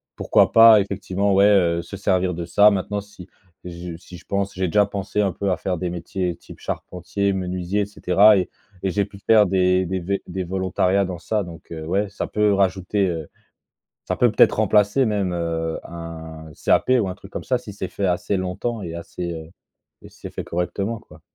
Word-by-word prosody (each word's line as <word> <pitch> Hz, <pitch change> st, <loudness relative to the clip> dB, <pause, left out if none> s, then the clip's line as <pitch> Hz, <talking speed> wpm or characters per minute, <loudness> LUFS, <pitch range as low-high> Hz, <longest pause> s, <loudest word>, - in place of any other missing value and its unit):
pourquoi -, -, +3 dB
pas 115 Hz, -1 st, +8 dB
effectivement, 100 Hz, 0 st, -1 dB
ouais, 100 Hz, +1 st, +6 dB
heu, 90 Hz, -5 st, +3 dB
se 85 Hz, -, -9 dB
servir 95 Hz, -2 st, +1 dB
de 85 Hz, 0 st, -5 dB
ça. 100 Hz, +5 st, +5 dB
Maintenant, 100 Hz, +1 st, -2 dB
si 100 Hz, -3 st, -12 dB, 0.4 s
j 85 Hz, -1 st, -7 dB
si 90 Hz, 0 st, -12 dB
je -, -, -18 dB
pense 100 Hz, 0 st, -2 dB
j'ai 95 Hz, 0 st, -1 dB
déjà 100 Hz, +4 st, +3 dB
pensé 100 Hz, 0 st, -2 dB
un 100 Hz, -3 st, 0 dB
peu 100 Hz, +1 st, -1 dB
à 90 Hz, -, 0 dB
faire 90 Hz, 0 st, -2 dB
des 90 Hz, 0 st, -3 dB
métiers 90 Hz, +1 st, -3 dB
type -, -, -14 dB
charpentier, 90 Hz, +3 st, -3 dB
menuisier 90 Hz, +1 st, -2 dB
et -, -, 0 dB
cetera 100 Hz, +1 st, +4 dB
et 90 Hz, -, -1 dB, 0.3 s
et 95 Hz, -, 0 dB
j'ai 100 Hz, +2 st, 0 dB
pu 100 Hz, -, -14 dB
faire 110 Hz, +1 st, +5 dB
des 90 Hz, 0 st, +2 dB
des 95 Hz, +2 st, -2 dB
vé 100 Hz, +3 st, -3 dB
des 95 Hz, +1 st, -4 dB
volontariats 95 Hz, +1 st, +1 dB
dans 90 Hz, -2 st, -6 dB
ça. 105 Hz, +4 st, -1 dB
Donc 85 Hz, -1 st, -11 dB
heu, 80 Hz, -1 st, -6 dB
ouais, 100 Hz, +5 st, 0 dB
ça 100 Hz, -, -4 dB
peut, 105 Hz, -, -4 dB
heu, -, -, +3 dB
rajouter, 95 Hz, +1 st, +1 dB
heu. 80 Hz, -4 st, -4 dB, 0.8 s
Ça -, -, 0 dB
peut 120 Hz, -3 st, +3 dB
peut-être -, -, +5 dB
remplacer 105 Hz, +4 st, +3 dB
même, 100 Hz, -4 st, 0 dB
heu, 80 Hz, -1 st, -2 dB
un 80 Hz, -1 st, -8 dB, 0.2 s
CAP -, -, +3 dB
ou 100 Hz, -, -1 dB
un 90 Hz, -, -4 dB
truc 95 Hz, +1 st, -14 dB
comme -, -, -6 dB
ça, 125 Hz, -, +1 dB
si 110 Hz, -4 st, -10 dB
c'est 95 Hz, -1 st, -5 dB
fait 100 Hz, -, -2 dB
assez 90 Hz, +2 st, 0 dB
longtemps 100 Hz, +5 st, -3 dB
et 85 Hz, -3 st, -6 dB
assez, 85 Hz, +1 st, -6 dB
heu 80 Hz, 0 st, -9 dB, 0.5 s
et -, -, -12 dB
si -, -, -22 dB
c'est -, -, -7 dB
fait -, -, -3 dB
correctement, 100 Hz, +6 st, -2 dB
quoi. -, -, -17 dB
95 Hz, 215 wpm, -22 LUFS, 90-100 Hz, 0.8 s, pas